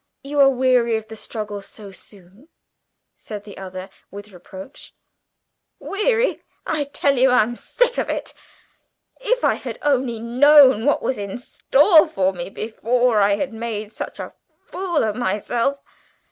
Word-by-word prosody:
"You 285 +1 -3
are 275 -1 +7
weary 250 -3 +2
of 220 0 -5
the 220 - -8
struggle 210 -2 -6
so 200 0 -12
soon?" 195 - -16 0.7
said 210 -2 -9
the 205 -2 -12
other 185 0 -8 0.2
with 205 +1 -11
reproach. 190 +6 -12 0.8
"Weary? 450 +4 0 0.2
I 300 -2 -1
tell 280 -1 0
you 265 +1 +5
I'm 240 -1 +2
sick - - -1
of - - -2
it! - - -4 0.9
If - - -1
I - - +3
had - - -7
only 260 -5 0
known 260 0 +5
what 290 - +1
was 260 - -2
in 200 +1 -5
store 300 +6 +3
for 190 0 0
me 175 0 -6
before 230 +2 0
I 200 0 +3
had 260 +4 -4
made 220 -2 -5
such - - -7
a - - -7 0.4
fool 360 -4 -1
of 215 -2 -1
myself!" 240 +4 -1
235 Hz, 150 wpm, -21 LUFS, 205-280 Hz, 0.9 s, are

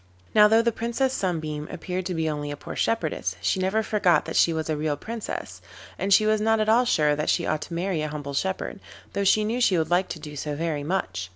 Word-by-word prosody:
Now 210 -1 +7
though 225 +2 +4
the 235 - +2
Princess 235 +4 -1
Sunbeam 155 - -2
appeared 180 +1 -4
to 180 - -3
be 160 -1 0
only 145 -1 -3
a 145 - -5
poor - - -8
shepherdess, 155 - -1
she 95 - 0
never 190 +4 +1
forgot 185 -7 +2
that - - -5
she 170 - +5
was 160 -1 -2
a 155 - 0
real 150 -1 -1
Princess, 225 +7 -6 0.4
and 195 - -1
she 215 +2 +6
was 215 0 +2
not 225 +1 +2
at 215 - +1
all 235 +3 +4
sure 150 -9 +3
that 150 - -2
she - - +1
ought 155 -1 -1
to 170 - -6
marry 175 -2 -1
a 155 - -1
humble 145 -2 -6
shepherd, 190 +6 -2 0.3
though 200 - 0
she 210 +2 +4
knew 235 +4 -1
she 190 -7 +4
would 160 0 -1
like 180 +2 +3
to 160 - -6
do 150 -1 -9
so 145 +1 -4
very 155 -2 -2
much. 95 - -2
175 Hz, 250 wpm, -25 LUFS, 150-215 Hz, 0.4 s, Now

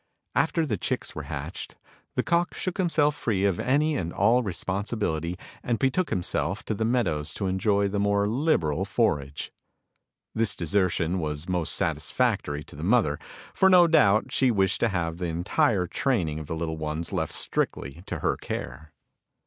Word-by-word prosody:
After 165 0 +2
the 110 -8 -1
chicks - - -2
were - - -6
hatched - - -6 0.4
the - - +1
cock 175 +1 +1
shook 185 -1 -3
himself 150 -5 +2
free 100 -7 0
of 95 -4 +1
any 150 +4 +2
and 85 -9 -2
all 115 +7 +3
responsibility, 95 -4 -2 0.2
and 120 -1 0
betook 135 +9 +1
himself 90 -1 -1
to - - -1
the 110 - -2
meadows 95 -11 0
to 100 - -3
enjoy 100 +2 +2
the 100 +1 -2
more 100 0 +2
liberal 105 - +1
forage. 75 - -1 0.8
This 115 -1 +2
desertion 90 0 +1
was 75 0 -4
most 90 -4 -1
satisfactory 75 0 0
to - - -14
the 75 - -8
mother, 95 -7 +2 0.3
for 190 - +4
no 180 -2 +8
doubt 110 -8 +4
she 130 0 +3
wished 95 -5 +2
to 120 - +2
have 85 -3 -2
the 90 - -2
entire 90 +3 +1
training 85 - 0
of 75 - -8
the 80 - -3
little 80 -1 -3
ones 80 +1 -4
left - - -1
strictly 70 +6 -2
to - - -4
her - - +1
care. 65 +6 -6
100 Hz, 165 wpm, -26 LUFS, 80-120 Hz, 0.8 s, no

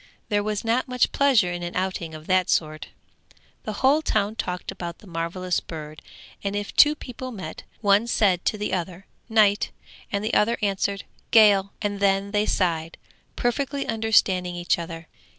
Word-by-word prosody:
There 205 -1 +2
was 210 0 -2
not 235 +4 +1
much 250 -1 +1
pleasure 250 -10 +3
in 175 0 -4
an 175 0 -5
outing 180 -3 -2
of 155 0 -10
that 185 0 +2
sort. 155 -1 0 0.8
The 215 - -3
whole 290 +4 +5
town 215 -6 0
talked 180 -4 -4
about 170 -1 -6
the - - -18
marvellous 175 +1 -2
bird, 155 -1 -9 0.4
and 200 0 -2
if 205 0 -4
two 300 +1 +7
people 255 -2 -8
met, 185 -8 -7 0.2
one 205 +2 +3
said 195 -6 +2
to 215 - +1
the 210 -2 -3
other 185 +1 -4 0.2
'Night,' 210 -2 +3 0.4
and 200 0 -1
the 220 - -2
other 230 +3 +3
answered 200 -1 -1 0.3
'Gale,' 200 -3 +5
and 205 -1 -2
then 195 0 +1
they 210 0 +1
sighed, 165 -3 0 0.4
perfectly 275 +3 -1
understanding 200 -5 +2
each 175 0 0
other. 165 0 -7
200 Hz, 170 wpm, -24 LUFS, 175-220 Hz, 0.8 s, two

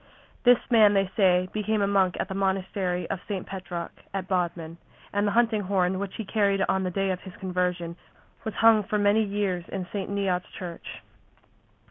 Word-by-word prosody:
This 245 0 +8
man, 215 -3 +6
they 195 -1 +1
say, 185 -3 +4
became 215 0 0
a - - +2
monk 190 -3 +2
at - - -1
the 190 - -5
monastery 190 -2 -1
of 190 - -2
St. 195 -3 -3
Petroc 175 -3 -6 0.2
at 190 -1 -3
Bodmin, 170 -3 -2 0.4
and 205 +1 +1
the - - +1
hunting 230 -2 +3
horn 185 -1 +1
which 200 -1 -5
he 220 - -5
carried 200 -2 +2
on 190 - +1
the 185 - -1
day 195 +1 0
of 180 - -4
his 190 -2 -11
conversion 180 -2 -2 0.5
was 220 - -4
hung 225 -1 +6
for 210 +2 -1
many 205 +1 +3
years 200 -3 -1
in 190 -2 -4
St. 195 -3 -3
Neot's 195 -3 -1
church. 175 -2 -7
195 Hz, 185 wpm, -26 LUFS, 180-205 Hz, 0.5 s, This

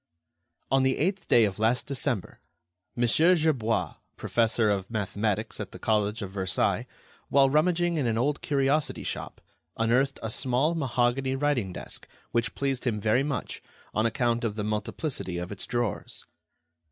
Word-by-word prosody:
On 135 0 +4
the 130 0 +2
eighth 190 +5 -1
day 115 -2 +6
of 100 0 -3
last 115 +3 +2
December, 130 -7 -2 0.6
Mon. 120 - +2
Gerbois, 155 -5 +2 0.2
professor 115 -1 +2
of 100 -2 0
mathematics 105 -1 -2
at - - -6
the - - -7
College 105 0 0
of 95 - -6
Versailles, 95 -2 0 0.4
while 135 -1 +5
rummaging 175 +2 +2
in 140 -5 +1
an 110 -1 0
old 140 +5 0
curiosity 140 +1 +1
shop, - - -5 0.4
unearthed 125 +4 +2
a 110 - -2
small 135 +6 +1
mahogany 130 -2 0
writing 135 -8 0
desk - - -6 0.2
which 115 0 0
pleased 135 -2 -1
him 110 -3 0
very 110 +5 +2
much 140 -1 -3 0.3
on 110 +2 +2
account 120 +1 0
of 110 -3 -1
the 105 - -3
multiplicity 105 - -3
of 90 +2 -5
its 100 - -5
drawers. 120 -2 -3
120 Hz, 155 wpm, -27 LUFS, 110-140 Hz, 0.6 s, day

